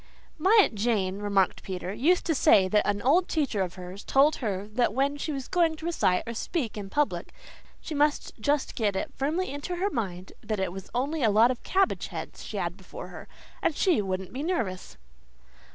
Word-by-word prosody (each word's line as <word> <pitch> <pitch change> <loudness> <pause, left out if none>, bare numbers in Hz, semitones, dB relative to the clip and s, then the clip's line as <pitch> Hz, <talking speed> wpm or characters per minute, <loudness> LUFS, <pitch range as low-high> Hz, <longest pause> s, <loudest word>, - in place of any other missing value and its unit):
"My 390 +8 +5
Aunt - - -1
Jane," 200 -3 0
remarked 200 -2 +1
Peter, 185 0 -5
"used 335 - +2
to 330 - +2
say 195 -8 +5
that 210 +2 +2
an 205 0 -1
old 335 +8 +4
teacher 275 - 0
of 180 -2 -2
hers 185 +2 -8
told 285 +3 +4
her 205 -4 -3
that 225 -1 +1
when 275 +2 +1
she 290 +2 -3
was 270 -3 -4
going 335 -3 +2
to 315 - -9
recite 190 - +1
or 230 - -4
speak 240 - -3
in 200 -2 -6
public 295 +6 -1 0.5
she - - -6
must 295 0 +1
just 285 +5 0
get 210 -4 0
it 280 +9 -3
firmly 310 +5 -1
into 290 +6 -4
her 390 +4 -1
mind 185 - -4
that 215 -2 -3
it 190 -2 -1
was 190 +1 -8
only 285 +5 -1
a 225 - +4
lot 220 +4 +5
of 250 - -5
cabbage 385 0 +1
heads - - -7
she - - -6
had - - -2
before - - -9
her, - - -10 0.3
and 315 - +1
she 345 - +3
wouldn't 190 -1 -4
be 260 - -4
nervous." 230 - -3
245 Hz, 205 wpm, -27 LUFS, 200-305 Hz, 0.5 s, My